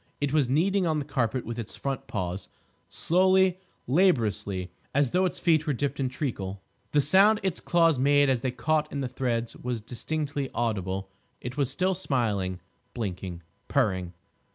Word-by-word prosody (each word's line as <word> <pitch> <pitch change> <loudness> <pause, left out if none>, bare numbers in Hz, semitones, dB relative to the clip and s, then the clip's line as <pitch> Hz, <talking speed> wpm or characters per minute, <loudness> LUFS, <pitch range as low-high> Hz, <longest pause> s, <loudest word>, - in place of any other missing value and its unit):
It 145 -1 -1
was 145 -5 +3
kneading 180 +6 +2
on 160 -1 +1
the 145 - -2
carpet 130 -3 -1
with 115 0 -5
its 115 - -6
front 135 -1 -4
paws—slowly, 175 - 0 0.3
laboriously, 110 - +1 0.2
as 140 -3 +3
though 185 +1 +3
its 180 - -2
feet 160 -2 +2
were 150 - +2
dipped 140 +2 -2
in 130 -2 0
treacle. 100 -8 -4 0.3
The 145 - +4
sound 195 +9 +5
its 190 -3 0
claws 165 -5 +3
made 145 +1 +4
as 130 -3 +1
they 130 - 0
caught 150 +5 0
in 140 - -3
the 130 - -1
threads 120 -2 -2
was 125 -2 -3
distinctly 140 +4 -3
audible. 95 -4 -2 0.3
It 125 +1 -6
was 140 -3 +1
still 185 +1 +1
smiling, 105 - -1 0.4
blinking, 90 -6 -4 0.2
purring. 95 -10 0
135 Hz, 160 wpm, -27 LUFS, 110-155 Hz, 0.4 s, sound